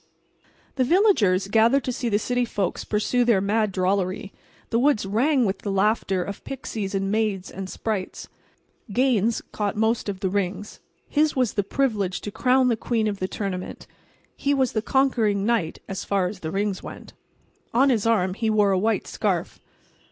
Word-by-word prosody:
The 260 - +3
villagers 245 - +3
gathered 230 +6 +3
to 255 - -2
see 245 -1 -2
the 205 - +2
city 245 +3 0
folks 200 -6 -2
pursue 220 +4 +1
their 235 -5 +3
mad 210 +2 +1
drollery. 190 +1 -1 0.4
The 230 - +2
woods 260 -6 +2
rang 250 +6 +2
with 195 -1 -1
the 205 - -5
laughter 195 -2 +1
of 200 +2 -7
pixies 220 -7 -5
and 195 0 -1
naiads 210 -3 -1
and 190 0 -6
sprites. 205 -3 -4 0.6
Gaines 235 -2 +2
caught 205 -2 -2
most 220 0 0
of 195 -1 -5
the 190 - 0
rings. 200 +1 -3 0.3
His 305 0 +1
was 255 -4 +1
the 205 - +1
privilege 200 -4 -1
to 205 - -5
crown 255 +3 +3
the 240 - +2
queen 220 0 -1
of 200 -2 -3
the 185 - -1
tournament. 185 -2 -5 0.5
He 280 0 0
was 260 -2 +1
the 220 - -1
conquering 225 -6 +1
knight—as 195 -3 -2
far 195 -2 0
as 185 +2 -4
the 160 - -5
rings 195 +2 -1
went. - - -10 0.6
On 265 +4 +4
his 225 -3 +1
arm 190 -5 +2
he 220 +3 -1
wore 210 -2 +3
a 190 - +2
white 220 +3 0
scarf. - - -2
210 Hz, 175 wpm, -24 LUFS, 195-240 Hz, 0.6 s, On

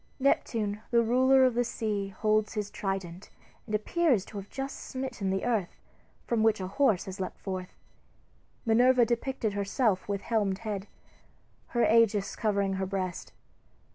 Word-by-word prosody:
Neptune, 215 -6 0
the 235 -1 +4
ruler 260 +3 +4
of 255 - +3
the 245 +1 +2
sea, 210 -4 -2
holds 215 +2 0
his 210 -1 -3
trident, 195 -2 -4 0.4
and 215 - -1
appears 250 - +1
to 210 - -9
have 200 0 -7
just 270 0 -5
smitten 260 -7 -4
the 190 +3 -1
earth, 220 -7 -1 0.5
from 235 -2 0
which 220 -1 +3
a 185 - -3
horse 210 -1 +2
has 190 -1 -7
leaped 185 - -4
forth. 185 -2 -6 0.9
Minerva 245 +2 +5
depicted 235 -2 -1
herself 200 0 0
with 200 -1 -1
helmed 205 -5 0
head, 210 -2 -5 0.8
her 240 - +1
Aegis 220 -3 +3
covering 200 -3 0
her 190 - -1
breast. 185 -2 -4
215 Hz, 150 wpm, -29 LUFS, 195-240 Hz, 0.9 s, Minerva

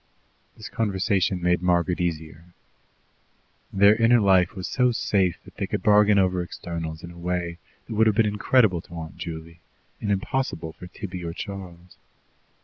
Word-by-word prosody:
This 110 - -8
conversation 95 -3 0
made 90 0 +2
Margaret 90 0 +1
easier. 80 0 -5 1.2
Their 100 +2 +5
inner 115 +2 +4
life 95 -2 +3
was 95 -2 -5
so 125 -1 +2
safe 95 -6 +1
that - - -16
they - - -2
could - - -3
bargain 105 0 +5
over 95 -2 +2
externals 85 -2 -6
in 85 - -8
a 85 - -14
way 85 -1 -3 0.3
that 115 - -7
would 110 +1 +4
have 110 - +2
been 115 - +4
incredible 105 -2 +2
to 85 - -13
Aunt 80 -1 -7
Juley, 85 0 -7 0.4
and 105 - -3
impossible 95 - -2
for 90 - -11
Tibby 90 0 -7
or 85 -1 -4
Charles. 90 -3 -9
90 Hz, 160 wpm, -25 LUFS, 85-105 Hz, 1.2 s, Their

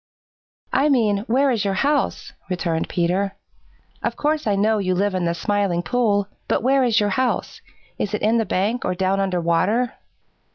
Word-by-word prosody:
"I 290 +2 +3
mean, 220 -7 +2
where 265 +4 +3
is 225 -4 0
your 195 -1 0
house?" 285 +7 0 0.2
returned 170 -3 -2
Peter. 185 +3 0 0.7
"Of - - -2
course 305 -3 -1
I 205 - +2
know 215 +2 +2
you 185 -2 0
live 200 +2 0
in 185 -2 -1
the 170 0 0
Smiling 200 -2 0
Pool, 205 0 +1 0.2
but - - 0
where 270 +1 +3
is 230 -3 +3
your 205 -1 +1
house? 255 +5 -1 0.4
Is 210 - -1
it - - -5
in 225 +2 +3
the - - +2
bank 205 +6 -1
or 180 - -1
down 190 +1 0
under 190 -2 0
water?" 185 +9 +1
205 Hz, 180 wpm, -22 LUFS, 185-235 Hz, 0.7 s, I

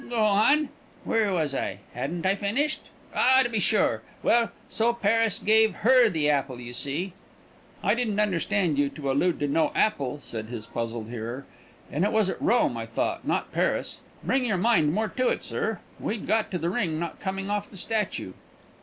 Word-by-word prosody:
"Go 240 - -3
on? 220 +9 +4 0.3
Where 220 -3 +1
was 155 -6 0
I? 100 - -2 0.2
Hadn't 160 +9 -3
I 190 - +4
finished? 210 +10 0 0.3
Ah, 260 +1 +5
to 240 - -2
be 225 -3 0
sure! - - +2 0.2
Well, 235 -1 +3 0.2
so 235 +2 +1
Paris 225 -1 +2
gave 220 -2 +3
her 250 -2 +6
the 155 -6 0
apple, 140 -4 0
you 120 0 -8
see." 150 +9 -2 0.7
"I - - +3
didn't 225 -4 -1
understand 180 -5 +1
you 145 -1 +2
to 140 -1 -3
allude 170 +5 +1
to 145 - +1
no 155 +3 +2
apple," 145 -10 +1
said 110 -5 -6
his 115 -2 -7
puzzled 115 -1 -4
hearer; 120 +3 -5 0.5
"and 150 +6 0
it 205 - +2
was 215 -3 +2
at - - -8
Rome, 325 +5 +2
I - - -5
thought, - - -2
not - - -1
Paris. - - -1 0.2
Bring 260 0 +1
your 215 -6 +1
mind 180 -7 +3
more 215 +5 0
to 255 +5 0
it, - - 0
sir; - - -2 0.2
we'd 215 -1 -3
got 220 -1 +1
to 180 - -2
the 170 +1 -1
ring 175 -8 -1
not 170 0 -5
coming 195 +1 -3
off 205 0 -2
the 195 - -11
statue." 210 - -2
195 Hz, 190 wpm, -26 LUFS, 145-220 Hz, 0.7 s, her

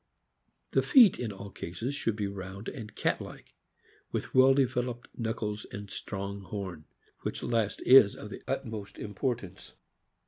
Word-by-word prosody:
The - - +4
feet 240 - +7
in 120 -3 -2
all 100 0 -9
cases 115 +12 -4
should 115 -6 -1
be 105 -1 -2
round 100 +1 -6
and 110 -6 -7
cat - - 0
like, - - -10 0.6
with - - -3
well 130 +1 +7
developed 125 -2 0
knuckles 110 -2 -3
and 100 -1 -7
strong 100 0 -5
horn, 95 -6 -6 0.3
which - - -4
last 115 -3 0
is 125 -6 +8
of 105 - -9
the - - -7
utmost 110 -7 -4
importance. 105 -1 -4
105 Hz, 145 wpm, -30 LUFS, 100-125 Hz, 0.6 s, is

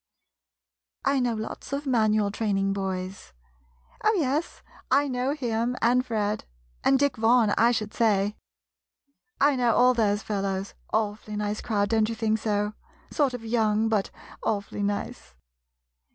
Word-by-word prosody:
I 275 0 +3
know 245 -2 0
lots 220 +5 -6
of 285 +1 -2
Manual 215 -5 +2
Train 210 -2 -1
ing 195 0 +1
boys. 190 - -4 0.7
Oh, 435 - +4
yes, 305 -3 -1 0.3
I 280 +2 +3
know 255 +1 -1
him, 240 -3 -1
and 250 +2 +3
Fred, 215 -4 -2 0.4
and 270 - +4
Dick 285 -1 +1
Vaughan, 225 -1 +4
I 230 - +4
should 215 -3 -2
say. 210 -2 +2 1.0
I 285 0 +4
know 240 -3 +2
all 250 +1 +5
those 210 -3 +1
fellows 195 -1 -2
— - - -30
awfully 215 0 -2
nice 210 0 -2
crowd, 205 -2 0
don't 220 -1 +2
you 230 - -3
think 220 -1 0
so? 210 -1 -1 0.4
Sort 280 -5 +1
of 230 -2 -8
young, 220 -1 +1
but 210 -3 +1 0.3
awfully 205 -1 -2
nice! 205 0 -3
220 Hz, 150 wpm, -26 LUFS, 205-250 Hz, 1.0 s, all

